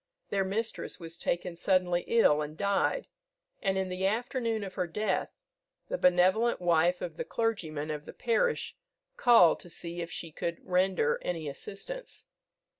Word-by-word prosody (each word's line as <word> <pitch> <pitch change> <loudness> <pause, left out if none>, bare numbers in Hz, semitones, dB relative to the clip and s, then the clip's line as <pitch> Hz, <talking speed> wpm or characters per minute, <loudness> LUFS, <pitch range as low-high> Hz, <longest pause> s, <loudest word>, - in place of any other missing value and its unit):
Their 195 -1 +1
mistress 215 +3 -3
was 165 -1 -7
taken 175 0 -2
suddenly 180 -1 +2
ill 150 -10 +4
and 150 +1 -5
died, 200 - +1 0.6
and 195 -1 +1
in 190 0 0
the 185 +1 0
afternoon 230 0 -1
of 190 -2 -6
her 180 -2 -1
death 210 +6 -1 0.6
the - - -1
benevolent 185 +6 +4
wife 175 0 +3
of 165 -2 -5
the - - -2
clergyman 160 -10 -2
of 150 -1 -5
the - - -9
parish 245 - 0 0.4
called 230 -10 +6
to 175 - -13
see 170 +1 -5
if 170 - -5
she 165 - -6
could 170 +2 -3
render 190 - +2
any 165 -3 -3
assistance. 200 - -8
185 Hz, 155 wpm, -30 LUFS, 170-220 Hz, 0.6 s, called